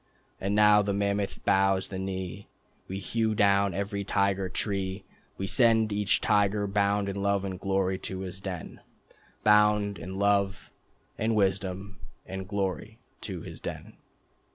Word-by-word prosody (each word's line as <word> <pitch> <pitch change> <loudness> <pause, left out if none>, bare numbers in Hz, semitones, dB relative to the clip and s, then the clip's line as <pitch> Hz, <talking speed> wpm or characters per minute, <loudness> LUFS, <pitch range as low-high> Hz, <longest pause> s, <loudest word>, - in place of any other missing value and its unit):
And 100 +2 -1
now 105 0 +6
the 100 0 -1
mammoth 100 0 -1
bows 95 0 +2
the 95 - -5
knee, 95 +1 -5 0.4
We 95 - -4
hew 110 +2 -1
down 100 -2 +3
every 100 +1 -2
Tiger 100 -1 0
Tree, 95 -1 -3 0.3
We 95 - -3
send 115 -1 +3
each 105 -1 +2
tiger 105 0 +2
bound 100 0 +1
in 100 0 -3
love 100 0 +1
and 95 -2 -5
glory 95 -1 0
to 95 0 -5
his 95 0 -7
den, 95 -4 -6 0.6
Bound 105 -1 +4
in 95 +3 -7
love... 100 0 +1 0.5
and 110 0 +1
wisdom... 95 -1 -1 0.3
and 95 0 -6
glory,... 95 -3 -3 0.2
to - - -5
his - - -10
den." - - -7
100 Hz, 145 wpm, -28 LUFS, 95-105 Hz, 0.6 s, now